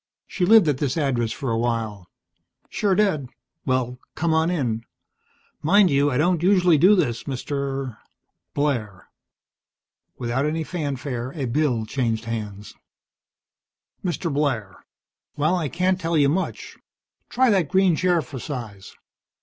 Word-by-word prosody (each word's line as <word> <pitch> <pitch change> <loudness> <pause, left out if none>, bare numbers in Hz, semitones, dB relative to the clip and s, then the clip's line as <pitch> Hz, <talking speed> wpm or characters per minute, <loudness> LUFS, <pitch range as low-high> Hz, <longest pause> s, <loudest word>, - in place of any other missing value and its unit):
She 180 - -1
lived 215 -4 +7
at 140 -3 +1
this 140 -1 -1
address 125 -7 0
for 135 0 -3
a 115 - 0
while." 110 -6 -2 0.6
"Sure 200 -3 +1
did. 185 -10 +1 0.4
Well, 125 -1 0 0.2
come 165 0 0
on 160 +1 +2
in. 120 -10 -1 0.8
Mind 190 +3 +4
you, 140 +1 +3
I 125 - -1
don't 170 +2 +2
usually 180 -4 +4
do 190 +7 +6
this, 120 - -1
Mr. 135 -2 -4 0.3
" - - -56
"Blair." 115 -10 -2 1.1
Without 125 +4 -1
any 160 +1 -1
fanfare 140 -6 -4
a 140 -4 -3
bill 125 -3 0
changed 115 -2 -2
hands. 105 -3 -5 1.3
"Mr. 175 -3 -2
Blair. 125 -9 -2 0.5
Well, 155 +5 +2
I 160 -5 -1
can't 185 +3 0
tell 165 0 0
you 140 -2 +4
much. 185 +6 -3 0.5
Try 255 -1 +3
that 185 -7 +2
green 190 -3 +3
chair 175 0 +2
for 130 0 -8
size. 115 -9 -7
140 Hz, 140 wpm, -23 LUFS, 120-170 Hz, 1.3 s, lived